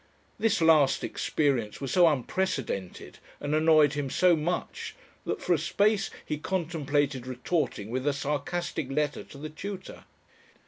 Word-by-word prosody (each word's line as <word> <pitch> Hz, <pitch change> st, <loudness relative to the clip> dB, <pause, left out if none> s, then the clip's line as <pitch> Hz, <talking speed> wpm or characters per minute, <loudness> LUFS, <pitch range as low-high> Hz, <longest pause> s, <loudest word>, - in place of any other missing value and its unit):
This 220 Hz, -3 st, +2 dB
last 155 Hz, -4 st, +5 dB
experience 130 Hz, -8 st, 0 dB
was 135 Hz, -2 st, -4 dB
so 175 Hz, -2 st, +6 dB
unprecedented 135 Hz, -, -2 dB, 0.2 s
and 145 Hz, +1 st, -3 dB
annoyed 155 Hz, -2 st, +5 dB
him 145 Hz, -2 st, -2 dB
so 180 Hz, +5 st, +4 dB
much 165 Hz, +3 st, -3 dB, 0.3 s
that -, -, -1 dB
for -, -, +3 dB
a -, -, +2 dB
space 205 Hz, 0 st, +2 dB, 0.2 s
he 150 Hz, -, -3 dB
contemplated 145 Hz, -7 st, -1 dB
retorting 125 Hz, -, -2 dB
with 130 Hz, +3 st, -2 dB
a 145 Hz, -, +3 dB
sarcastic 145 Hz, +1 st, -2 dB
letter 150 Hz, +1 st, -1 dB
to -, -, -13 dB
the 155 Hz, +2 st, -6 dB
tutor. 190 Hz, +4 st, -7 dB
150 Hz, 140 wpm, -28 LUFS, 135-175 Hz, 0.3 s, so